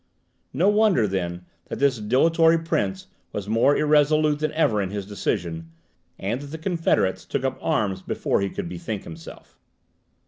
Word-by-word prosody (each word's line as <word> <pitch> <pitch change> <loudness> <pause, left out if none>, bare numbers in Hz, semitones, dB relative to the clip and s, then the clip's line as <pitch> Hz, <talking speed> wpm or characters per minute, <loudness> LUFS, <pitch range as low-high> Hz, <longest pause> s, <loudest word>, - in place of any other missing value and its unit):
No 165 +9 +1
wonder, 205 - +4
then, 90 -2 -3 0.2
that - - -6
this 135 -4 +2
dilatory 160 +9 +4
prince 155 - -2 0.3
was 100 -1 -5
more 115 +6 +3
irresolute 150 0 +3
than 155 0 -1
ever 115 -10 +2
in 95 - -2
his 100 0 -4
decision, 85 -5 -3 0.5
and 115 +7 -3
that 145 - -8
the 155 +3 -7
confederates 165 - 0
took - - -3
up - - -2
arms 95 -3 0
before - - -1
he 100 - 0
could - - -5
bethink 90 +4 -5
himself. 80 0 -12
115 Hz, 160 wpm, -24 LUFS, 95-155 Hz, 0.5 s, wonder